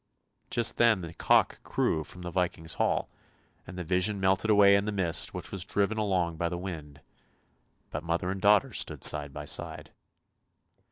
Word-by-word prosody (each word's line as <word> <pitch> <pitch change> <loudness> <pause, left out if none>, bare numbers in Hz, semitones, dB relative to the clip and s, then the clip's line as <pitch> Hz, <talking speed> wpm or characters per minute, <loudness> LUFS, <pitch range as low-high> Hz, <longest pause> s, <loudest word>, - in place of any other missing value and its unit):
Just 115 - +1
then 115 -5 +4
the 85 -1 -8
cock - - +2
crew 80 - -1
from 90 +4 -10
the 90 - -6
Viking's 85 -2 -2
hall, - - 0 0.6
and 90 - -9
the 90 - -4
vision 90 +4 0
melted 95 +3 +1
away 100 -1 +6
in 100 0 +1
the 105 - -2
mist 85 -5 0
which - - -6
was 95 -3 -3
driven 100 +2 -1
along 90 -6 -1
by 85 +1 -1
the 90 - -4
wind, 75 -6 -8 0.9
but 75 - -5
mother 85 +2 -2
and 95 0 -5
daughter 105 0 +4
stood - - -1
side 75 -2 +4
by - - -8
side. - - -3
90 Hz, 175 wpm, -28 LUFS, 85-100 Hz, 0.9 s, away